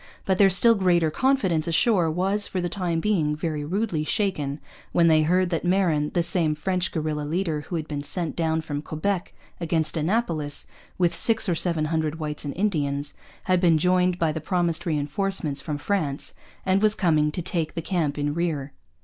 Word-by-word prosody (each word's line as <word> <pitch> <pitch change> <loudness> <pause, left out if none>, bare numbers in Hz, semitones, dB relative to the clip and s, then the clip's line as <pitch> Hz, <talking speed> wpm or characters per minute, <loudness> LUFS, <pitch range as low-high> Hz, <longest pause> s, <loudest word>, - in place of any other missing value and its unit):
But 190 -1 0
their 200 -1 +7
still 210 +5 +6
greater 175 -6 +2
confidence 190 - +1
ashore 175 0 +2
was, 195 +5 0
for 185 - -3
the 175 0 -2
time 175 -4 -1
being, 165 -6 +1
very 155 -1 -3
rudely 175 0 -1
shaken 155 -6 -1 0.3
when 170 -1 +4
they 155 -1 +5
heard 180 +3 +1
that 165 - -1
Marin, 175 -5 +1
the 175 - +2
same 165 -3 +2
French 185 +4 -1
guerilla 155 -2 -2
leader 160 0 -2
who 165 +4 -6
had 160 -2 -3
been 145 -2 -4
sent 160 +3 -3
down 160 -1 0
from 145 -2 -4
Quebec 175 +5 -3 0.3
against 165 -2 0
Annapolis 160 -4 -1 0.3
with 175 -2 +2
six 220 +6 +4
or 180 - +2
seven 165 -2 0
hundred 160 -1 -1
whites 150 -2 -5
and 145 - -5
Indians, 145 -8 -1 0.3
had 185 -1 +2
been 170 -3 +4
joined 180 +2 +2
by 165 -3 +1
the 160 0 -5
promised 175 0 -1
reinforcements 150 0 -1
from 150 +1 -4
France 145 -4 -2 0.3
and 190 +1 +2
was 215 0 +5
coming 155 -5 +2
to 175 - -4
take 165 -3 -2
the 165 - -2
camp 160 -6 -1
in 145 0 -1
rear. 150 -4 -2
165 Hz, 185 wpm, -24 LUFS, 155-185 Hz, 0.3 s, their